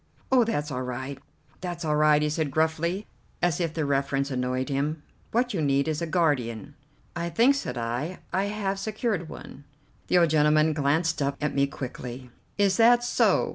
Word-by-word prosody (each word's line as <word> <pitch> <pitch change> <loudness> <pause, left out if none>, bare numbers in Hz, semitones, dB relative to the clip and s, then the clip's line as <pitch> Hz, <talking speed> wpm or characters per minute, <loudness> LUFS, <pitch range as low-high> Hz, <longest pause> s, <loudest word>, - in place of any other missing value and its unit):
"Oh, 255 -2 +6
that's 150 -10 -2
all 125 -1 -2
right, 130 +2 -5 0.4
that's 175 -2 -5
all 150 -1 +1
right!" 150 0 +4
he 150 - +1
said 155 -1 -1
gruffly, 160 +6 0 0.3
as 175 -2 +1
if 165 -2 -2
the 160 -2 0
reference 140 0 0
annoyed 130 0 -1
him. 145 +2 -2 0.3
"What 245 +1 +1
you 175 - -1
need 140 -1 +2
is 155 0 -1
a 170 - -1
guardian." 145 - 0 0.4
"I 170 0 -2
think," 235 +9 +4
said 130 - -4
I, 120 +10 -3 0.2
"I 190 +2 +1
have 200 -1 -2
secured 210 -4 -2
one." 140 - -10 0.4
The - - +3
old 170 -3 +4
gentleman 155 0 +4
glanced 155 +3 +1
up 140 0 0
at 150 -1 -1
me 140 0 +2
quickly. 125 -2 -7 0.3
"Is 200 -2 +3
that 240 +1 +6
so? 245 - +2
155 Hz, 180 wpm, -26 LUFS, 140-180 Hz, 0.4 s, Oh